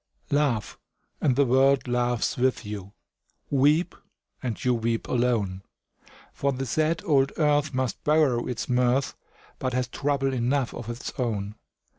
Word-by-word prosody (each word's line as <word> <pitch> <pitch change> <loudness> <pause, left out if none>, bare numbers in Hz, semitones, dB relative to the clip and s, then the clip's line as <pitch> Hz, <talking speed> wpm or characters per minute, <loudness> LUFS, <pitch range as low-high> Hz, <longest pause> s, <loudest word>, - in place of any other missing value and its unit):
Laugh, 140 -7 0 0.4
and 130 - +3
the 140 +1 +4
world 135 +2 +3
laughs 120 -1 0
with 130 -2 0
you; 100 -2 -6 0.6
Weep, 150 +6 +3 0.5
and 120 -3 -4
you 125 - +4
weep 115 -1 -1
alone; 115 -7 0 0.7
For 140 - 0
the 135 0 -3
sad 155 +6 0
old 140 -3 +3
earth 150 -1 +2
must 130 -2 -2
borrow 150 -6 +2
its 125 -3 -3
mirth, 125 +2 +1 0.4
But 130 -1 -2
has 125 0 0
trouble 135 +1 -1
enough 125 +1 0
of 115 - -7
its 120 +3 -5
own. 105 -5 -2
130 Hz, 140 wpm, -26 LUFS, 120-140 Hz, 0.7 s, the